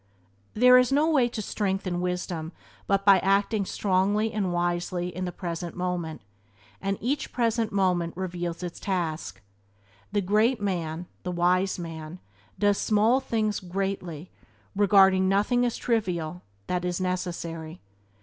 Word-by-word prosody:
There 250 +2 +7
is 250 +1 +2
no 295 +3 +3
way 260 -6 +3
to 225 -3 -5
strength 195 -1 -2
and 175 -1 -2
wisdom 180 -2 -3 0.3
but 195 0 +1
by 195 -2 +7
acting 200 +2 +1
strongly 205 +4 +1
and 200 -4 -1
wisely 175 +1 -1
in 185 +1 -3
the 180 - -3
present 170 -1 -5
moment, 180 -3 -3 0.6
and 195 0 -1
each 275 +6 -2
present 230 -2 0
moment 180 -4 0
reveals 175 -2 -4
its 175 -1 -6
own - - -12
task. 160 - -2 0.7
The 205 0 +1
great 215 +6 +2
man, 175 -4 -2 0.2
the 180 - -4
wise 180 +2 +2
man 165 -1 -7 0.4
does 205 -1 +2
small 220 +4 +3
things 215 -5 -1
greatly 185 -3 -4 0.4
regarding 195 -2 +5
nothing 245 +5 +2
as 235 - -3
"trivial" 180 -7 -1 0.2
that 180 0 -2
is 180 0 -1
necessary. 170 -3 -4
185 Hz, 140 wpm, -26 LUFS, 175-210 Hz, 0.7 s, There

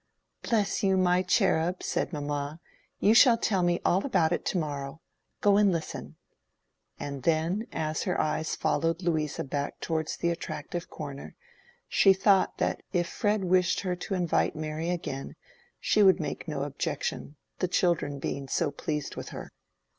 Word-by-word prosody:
"Bless 215 -4 0
you, 190 -1 +3
my 180 -1 +3
cherub!" 180 -2 +1
said - - -1
mamma; 145 0 -3 0.4
"you 210 - +5
shall 235 0 +7
tell 200 -4 +1
me 175 0 +2
all 190 +3 +3
about 170 -12 +2
it 175 - 0
to - - 0
morrow. 145 -2 -4 0.4
Go 200 -1 +5
and 205 -2 +5
listen!" 165 -3 -4 0.8
and 140 -2 -5
then, 165 - 0
as 155 -1 -2
her - - -1
eyes 155 0 0
followed 165 +2 0
Louisa 155 -4 0
back 140 +1 -3
towards 160 -1 -2
the 170 - 0
attractive 175 0 -5
corner, 140 -2 -8 0.5
she 195 - +5
thought 190 0 +3
that - - -1
if 175 -2 +1
Fred 205 +1 0
wished 185 0 +2
her 185 -2 -1
to 190 +2 -4
invite 175 -3 +1
Mary 155 +2 -3
again 165 -6 -4 0.4
she 215 - +2
would 190 -2 +6
make 160 - -4
no 145 -3 -2
objection, 145 +1 -3 0.2
the 185 - +1
children 170 -5 +1
being 140 0 -4
so 150 +2 0
pleased 150 0 -4
with - - -6
her. - - -8
170 Hz, 160 wpm, -28 LUFS, 150-185 Hz, 0.8 s, shall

